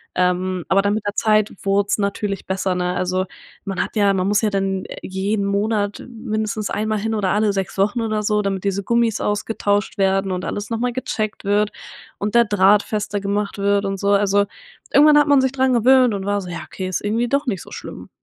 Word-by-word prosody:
Ähm, 180 0 0
aber 195 - +4
dann 200 +1 +1
mit 215 - -4
der 205 - -1
Zeit 215 -1 +2
wurd's 200 +1 +1
natürlich 200 -1 -2
besser, 190 -1 -1
ne? 180 0 -1
Also, 185 +1 -1 0.4
man 195 -2 -2
hat - - -4
ja 200 -2 +3
man 185 -1 0
muss 205 +1 +2
ja 215 - +2
dann, 195 -1 -1
äh, - - -9
jeden 200 +2 -1
Monat 205 0 -1
mindestens 215 -2 -3
einmal 215 0 -1
hin 225 +2 -2
oder 200 -3 0
alle 210 0 +2
6 195 0 -3
Wochen 205 +5 +1
oder 215 -1 -1
so, 210 0 +1
damit 195 -2 -2
diese 200 0 -1
Gummis 235 -1 +1
ausgetauscht 205 0 -1
werden 195 0 +1
und 180 -1 -3
alles 205 +2 -4
noch 225 - -1
mal 245 +1 0
gecheckt 215 -4 -3
wird 205 +1 +2 0.5
und 205 +2 -3
der 235 0 +6
Draht 205 0 +4
fester 205 -1 -3
gemacht 200 +1 -2
wird 200 0 +1
und 195 0 -2
so. 200 - 0
Also, 200 0 +3 0.5
irgendwann 295 +1 +6
hat 295 - +3
man 285 -2 +5
sich 265 -1 +1
dran 260 -1 +2
gewöhnt 250 0 +5
und 195 -1 -5
war 205 0 0
so: 180 - -8
„Ja 170 - -5
okay, 185 -1 -6
ist 185 - -2
irgendwie 230 +3 0
doch 280 +3 +1
nicht 195 -9 -2
so - - -13
schlimm.“ - - -9
205 Hz, 220 wpm, -20 LUFS, 195-215 Hz, 0.5 s, der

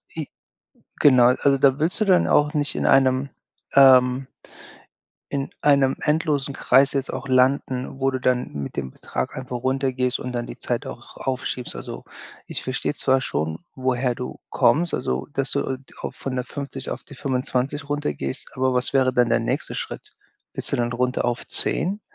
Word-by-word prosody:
J 155 -3 -4 0.7
genau. 130 -4 +6
Also, 140 -1 +4
da 135 +1 +3
willst 165 +7 0
du - - +4
dann 185 -2 +4
auch 150 0 +3
nicht 145 -1 -1
in - - -1
einem 135 0 +4 0.5
ähm, 130 -1 +6 1.0
in 140 -1 -2
einem 140 -2 +4
endlosen 150 -3 0
Kreis 135 +2 +4
jetzt 140 -1 -2
auch 130 +1 -5
landen, 130 0 +1
wo 135 0 +2
du 130 - -2
dann 125 -1 0
mit 70 -1 -5
dem 65 -2 -3
Betrag - - -4
einfach 130 -1 -5
runtergehst 130 -1 0
und 125 - -4
dann 120 -1 -3
die - - -8
Zeit 125 +3 -3
auch 120 -2 -10
aufschiebst. 130 -1 -3
Also, - - -7 0.4
ich - - -4
verstehe 130 +3 -2
zwar 130 -2 +2
schon, 80 - -2 0.2
woher 130 -1 0
du 125 - -6
kommst, 160 +8 +3
also, 65 +2 -2
dass 135 0 -1
du 130 - 0 0.2
auch - - -4
von 130 -1 -5
der 125 - -1
50 140 -1 -5
auf - - -5
die 140 - -12
25 130 +2 -2
runtergehst, 75 - -3
aber 130 0 +1
was 125 0 +2
wäre 130 -1 +3
dann 120 -1 +3
der - - +3
nächste - - -2
Schritt? - - -6 0.4
Willst - - -2
du - - +2
dann 120 0 -1
runter 125 +1 0
auf 120 0 -1
10 195 +4 0
130 Hz, 175 wpm, -23 LUFS, 125-140 Hz, 1.0 s, genau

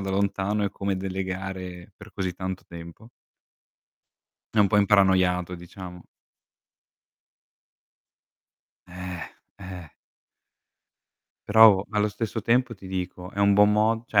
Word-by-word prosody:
da 95 0 -4
lontano 100 +1 0
e 100 - -1
come 100 -1 -3
delegare 95 -1 -5
per - - -14
così 95 -3 -3
tanto 95 0 -5
tempo. 85 +6 -11 1.5
È - - +1
un 105 - +6
po' 105 - +1
imparanoiato 95 -3 +3
diciamo. 90 0 -10 2.9
Eh, 90 -1 -8 0.2
eh. 90 -5 -9 1.6
Però 105 -2 +7
allo 105 -1 +1
stesso 110 +2 -4
tempo 120 +3 +1
ti 95 -2 -13
dico 90 -1 -5
è - - -9
un 100 0 +5
buon 105 +1 +5
mo 110 +2 +1
cioè 105 - +3
95 Hz, 115 wpm, -25 LUFS, 90-105 Hz, 2.9 s, Però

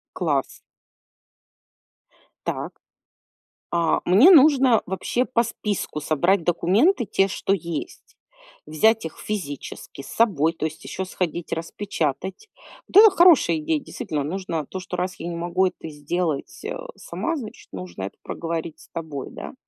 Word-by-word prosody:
Класс. - - -1 1.9
Так. - - -3 1.0
А, 170 -1 +2
мне 205 - +7
нужно 270 - +6
вообще 190 +7 -1
по 235 -2 +1
списку 210 -8 -3
собрать 170 +5 +2
документы, 210 - +3
те, 195 -1 +2
что 195 0 -1
есть. 200 - -5 0.5
Взять 215 +8 +2
их 160 - -7
физически 145 -9 -6
с - - -11
собой. 165 -9 +2
То 160 - -3
есть 155 0 -5
ещё 190 - -4
сходить 175 -2 -3
распечатать. 180 - -3 0.4
Да, 425 +3 +8
хорошая 345 -4 +5
идея. 310 0 0
Действительно, 195 - -4
нужно 165 -1 -3
то, 190 - -6
что 185 -1 -6
раз 180 +1 -2
я 170 - -5
не 170 - -4
могу 175 +2 +1
это 175 -3 -7
сделать, 150 - -3
э, 475 - -3 0.2
сама, 335 0 -3
значит 235 -8 -8
нужно 90 0 -7
это 100 - -5
проговорить 165 -1 -4
с - - -18
тобой, 155 -5 -6
да. - - -8
185 Hz, 135 wpm, -23 LUFS, 160-235 Hz, 1.9 s, Да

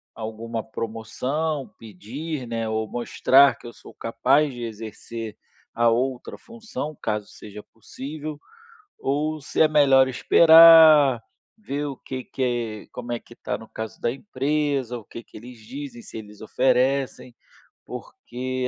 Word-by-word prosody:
alguma 110 +1 -5
promoção, 125 +7 -4
pedir, 125 - -7
né, 115 -1 -3
ou 110 0 -1
mostrar 130 +2 +4
que - - -18
eu - - -8
sou - - -15
capaz 135 +5 +1
de 120 -1 -7
exercer 115 0 -7 0.4
a 120 0 +2
outra 125 +2 -2
função, 220 - -7
caso 105 -2 -2
seja 105 0 -11
possível. 145 +7 -8 0.6
Ou 150 +3 -1
se - - -4
é 160 - +8
melhor 135 -3 +5
esperar, 160 -2 +7 0.4
ver 145 -7 -4
o 135 -2 -5
que 130 -1 -7
que 120 -5 -3
como 120 -1 -7
é 120 - -1
que 120 - -17
tá, 105 - -4
no 110 - -13
caso 110 0 -7
da - - 0
empresa, 140 - -2
o 110 - -13
que 115 - -10
eles 120 +2 -11
dizem, 130 +1 -8
se - - -9
eles 105 -1 -12
oferecem. 130 +2 0 0.5
Porque, 130 +1 -5
125 Hz, 140 wpm, -24 LUFS, 115-145 Hz, 0.6 s, é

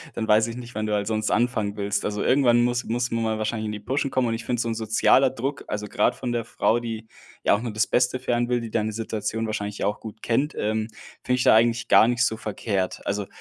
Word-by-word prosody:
dann 110 - -2
weiß 110 +1 +4
ich 115 - -6
nicht, 125 -1 -9
wann 110 0 -2
du 105 - -1
halt 100 -1 0
sonst 110 -1 -1
anfangen 110 -3 0
willst. 100 0 -1
Also, 105 0 -2
irgendwann 120 -3 +4
muss 120 +1 0
muss 120 +2 -1
man 115 0 0
mal 110 -1 0
wahrscheinlich 110 0 -2
in 105 - -3
die 105 - -5
Puschen 135 +6 -1
kommen 130 -2 +1
und 115 - -1
ich 115 +1 -4
finde 120 -1 -1
so - - -2
'n - - 0
sozialer 115 +4 +3
Druck, 135 +3 -4
also, 105 0 -4
grad 105 - +1
von 125 -2 -4
der 115 -1 -2
Frau, 115 0 +1
die 115 -2 -6 0.4
ja - - +4
auch 100 - +1
nur 120 -3 -4
das 110 +3 +2
Beste 125 +1 +2
für 125 -1 -1
einen 120 +1 0
will, 120 -1 +2
die 115 -2 -7
deine 110 -1 0
Situation 110 0 -3
wahrscheinlich 105 -1 -4
ja - - 0
auch 105 - -2
gut 110 0 -10
kennt, 135 +7 0
ähm, 110 +1 -1 0.4
finde 125 0 +1
ich 125 - 0
da - - +6
eigentlich 115 +1 +2
gar 110 - +7
nicht 120 0 +2
so 110 -2 -1
verkehrt. 100 -3 -3
Also, 100 0 -2
115 Hz, 270 wpm, -24 LUFS, 110-120 Hz, 0.4 s, gar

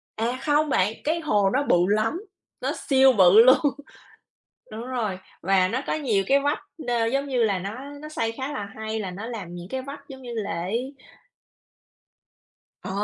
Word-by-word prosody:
À, 235 +3 -1
không 300 +1 +2
bạn, 210 -5 +2
cái 320 +3 0
hồ 210 -11 +2
nó 270 +6 +1
bự - - +3
lắm, 215 - +1 0.4
nó - - -1 0.2
siêu 265 -1 +6
bự 195 0 +7
luôn. 255 +2 +7 1.1
Đúng 225 +3 -6
rồi, 220 -7 -2 0.2
và 190 0 +3
nó 240 +7 -2
có - - 0
nhiều 235 -11 +1
cái 275 +1 +4
vách 285 +2 0 0.2
n 235 -1 0
giống 275 +1 0
như 255 -4 +1
là, 200 -4 +1
nó 200 +4 -5 0.3
nó 305 - -8
xây 230 -7 -1
khá 265 +5 -5
là 205 -7 -4
hay 220 0 -4
là 190 -3 -4
nó 200 +5 -7
làm 200 -8 -7
những 175 0 -8
cái 260 +2 -3
vách 280 +1 -10
giống 265 -1 -10
như 245 -2 -7
lễ 200 +10 -3 1.9
Ờ! - - -7
230 Hz, 185 wpm, -25 LUFS, 200-270 Hz, 1.9 s, bự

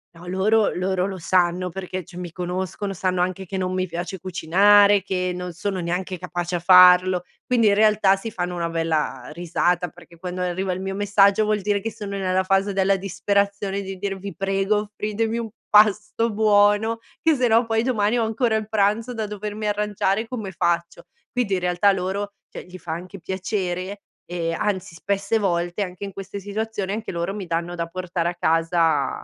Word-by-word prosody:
No, 170 - -13
loro 200 +4 +2
loro 185 0 0
lo 190 -2 -5
sanno 180 +1 +1
perché 185 0 -5
cioè 175 +1 -13
mi 175 -2 -6
conoscono, 185 +3 -4
sanno 185 -1 -1
anche 185 +1 -2
che 190 +2 -5
non 185 0 -1
mi 185 0 0
piace 175 +2 -5
cucinare, 200 +3 +4
che 180 -2 -1
non 180 -1 -5
sono 190 +2 -3
neanche 180 +2 -3
capace 175 0 -4
a - - 0
farlo, 180 0 +6 0.2
quindi 235 -3 +3
in 200 - +4
realtà 210 -2 +4
si 220 +3 -6
fanno 180 -1 -3
una 170 -1 -2
bella, 160 -6 -1
ehm, - - -9
risata, 175 +1 0
perché 170 0 -17
quando 180 +1 -5
arriva 180 +1 -1
il 185 - -5
mio 195 0 -3
messaggio 205 +1 +4
vuol 210 -1 0
dire 205 0 +1
che 225 +3 -4
sono 205 -2 -6
nella 185 0 +1
fase 195 +1 +1
della 195 0 +3
disperazione 200 +1 -1
di 190 -1 -7
dire: 195 -1 -2
"Vi 195 -1 -7
prego 195 +1 +1
offritemi 215 +2 -2
un 230 -2 -3 0.2
pasto 215 +2 +4
buono 210 +1 +3 0.2
che 320 -1 +3
se 255 -2 +2
no 230 +1 +4
poi 225 0 +1
domani 230 -2 +1
ho 230 - +2
ancora 225 0 0
il 215 -1 -2
pranzo 220 +3 +1
da 220 -2 -3
dovermi 210 +1 -5
arrangiare, 210 +1 0
come 220 -6 -5
faccio?" 170 -1 -1 0.3
Quindi 245 -6 -1
in 185 - +1
realtà 180 +3 +3
loro, 195 +2 -3 0.2
cioè, - - -9
gli 180 0 -11
fa 160 -2 -5
anche 185 +3 -8
piacere, 185 +1 -3 0.2
ehm, 165 -1 -2
anzi 190 -3 -2
spesse 200 +4 -1
volte 175 -1 0
anche 180 +1 -7
in 195 -1 -5
queste 195 +1 -7
situazioni 205 0 -3
anche 220 +1 -4
loro 170 +3 -3
mi 200 -3 -5
danno 170 +1 -2
da 170 -1 -2
portare 175 0 -2
a - - -4
casa 165 -4 +1
190 Hz, 190 wpm, -23 LUFS, 180-205 Hz, 0.3 s, farlo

